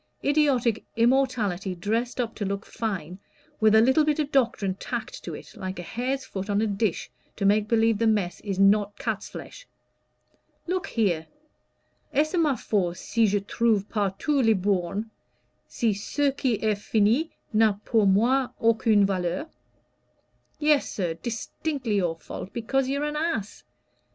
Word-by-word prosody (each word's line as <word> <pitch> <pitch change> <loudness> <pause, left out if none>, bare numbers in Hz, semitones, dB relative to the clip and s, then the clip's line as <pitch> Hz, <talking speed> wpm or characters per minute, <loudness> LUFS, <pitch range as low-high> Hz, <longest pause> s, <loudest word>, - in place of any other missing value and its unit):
idiotic 275 -6 +2
immorality 230 -7 +1
dressed 225 +8 -2
up 230 -2 -1
to 210 - -5
look 200 +1 -3
fine, 185 -5 -4 0.4
with 215 0 +5
a 220 - +7
little 265 +6 +4
bit 300 -1 +1
of 300 -2 -1
doctrine 235 -8 +1
tacked 190 - -6
to - - -5
it, - - -12
like 185 0 -5
a 175 - -5
hare's 260 +7 -3
foot 195 -2 -6
on 205 0 +2
a 220 - +2
dish, 205 -2 -1 0.2
to 200 - -2
make 205 +1 +3
believe 225 -1 +2
the 230 - +2
mess 205 -5 0
is 195 -3 -4
not 200 +1 +3
cat's - - -3
flesh. - - -10 1.0
Look 365 +1 -2
here! 175 -8 0 0.9
'Est 305 +3 +2
ce - - -13
ma 300 -5 +3
faute, 180 -7 -1
si 230 -2 +1
je 205 0 +1
trouve 210 0 +1
partout 215 +7 0
les 225 -1 +4
bornes, 195 +1 -1 0.6
si 225 -3 0
ce 275 +8 0
qui 265 -3 0
est 215 -1 +2
fini 225 +10 +2 0.2
n'a 215 -1 +4
pour 220 -4 +3
moi 240 +7 +3
aucune 225 -2 +4
valeur?' 185 - -2 1.1
Yes, 300 -2 +2
sir, 175 -5 -2
distinctly 235 - -3
your 175 -4 0
fault, 180 +3 -8
because 260 +3 0
you're 280 +2 -1
an 300 0 -3
ass. 300 - -2
220 Hz, 155 wpm, -26 LUFS, 200-260 Hz, 1.1 s, a